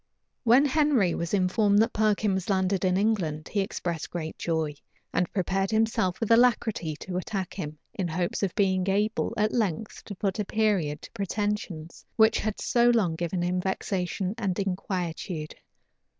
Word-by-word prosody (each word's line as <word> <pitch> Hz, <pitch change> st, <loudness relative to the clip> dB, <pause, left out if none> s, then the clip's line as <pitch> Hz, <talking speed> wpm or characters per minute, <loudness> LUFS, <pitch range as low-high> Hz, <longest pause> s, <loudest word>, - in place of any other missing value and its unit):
When 250 Hz, +4 st, +6 dB
Henry 280 Hz, -, +3 dB
was 170 Hz, -1 st, -3 dB
informed 200 Hz, +2 st, +3 dB
that 230 Hz, -, -3 dB
Perkin 215 Hz, -1 st, +2 dB
was 190 Hz, 0 st, -2 dB
landed 190 Hz, -1 st, +1 dB
in 185 Hz, 0 st, +2 dB
England, 180 Hz, -8 st, 0 dB
he 205 Hz, -, -1 dB
expressed 175 Hz, -5 st, -3 dB
great 160 Hz, -2 st, -5 dB
joy, 160 Hz, -3 st, -1 dB, 0.4 s
and 180 Hz, -, 0 dB
prepared 195 Hz, 0 st, 0 dB
himself 220 Hz, -5 st, +1 dB
with 225 Hz, -1 st, -1 dB
alacrity 230 Hz, -8 st, +3 dB
to 180 Hz, -1 st, -4 dB
attack 185 Hz, 0 st, -3 dB
him, 155 Hz, -5 st, -5 dB, 0.2 s
in 185 Hz, -, -2 dB
hopes 175 Hz, +6 st, -2 dB
of 195 Hz, -3 st, -1 dB
being 190 Hz, -1 st, +2 dB
able, 210 Hz, +4 st, +1 dB
at 215 Hz, +1 st, +1 dB
length, 210 Hz, -3 st, -2 dB
to 200 Hz, -, -7 dB
put 195 Hz, +2 st, -2 dB
a -, -, +2 dB
period 190 Hz, -9 st, 0 dB
to -, -, -10 dB
pretensions 200 Hz, -4 st, -3 dB
which 220 Hz, 0 st, +5 dB
had 215 Hz, -1 st, -3 dB
so 240 Hz, 0 st, +3 dB
long 215 Hz, -8 st, +3 dB
given 175 Hz, +2 st, -2 dB
him 180 Hz, +1 st, 0 dB
vexation 190 Hz, 0 st, -2 dB
and 195 Hz, -5 st, -1 dB
inquietude. 180 Hz, -4 st, -3 dB
195 Hz, 165 wpm, -27 LUFS, 175-215 Hz, 0.4 s, When